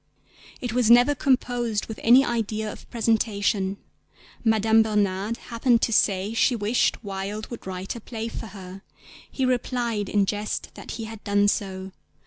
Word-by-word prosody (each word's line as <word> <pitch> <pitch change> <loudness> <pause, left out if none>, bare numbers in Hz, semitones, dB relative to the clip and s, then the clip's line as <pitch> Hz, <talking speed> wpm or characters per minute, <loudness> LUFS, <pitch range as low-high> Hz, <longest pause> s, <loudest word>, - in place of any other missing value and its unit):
It 245 -3 -3
was 245 -2 +2
never 245 +4 +7
composed 245 -5 0
with 220 - -8
any 250 +4 +6
idea 220 -2 -2
of - - -15
presentation. 205 -4 0 0.7
Madame 220 0 +4
Bernhardt 210 0 0 0.2
happened 230 0 +3
to 230 - +1
say 200 0 +2
she 240 +2 +3
wished 225 +2 +1
Wilde 200 +2 -5
would 235 - -8
write 190 +2 -5
a 235 - -8
play 225 0 -5
for 225 - -6
her; 190 -1 -10 0.5
he 265 - -1
replied 240 -4 -1
in 205 -1 +2
jest 210 +2 -3
that - - -8
he 230 - -5
had 220 -1 -9
done 205 0 +2
so. 190 -2 -2
220 Hz, 155 wpm, -25 LUFS, 200-235 Hz, 0.7 s, never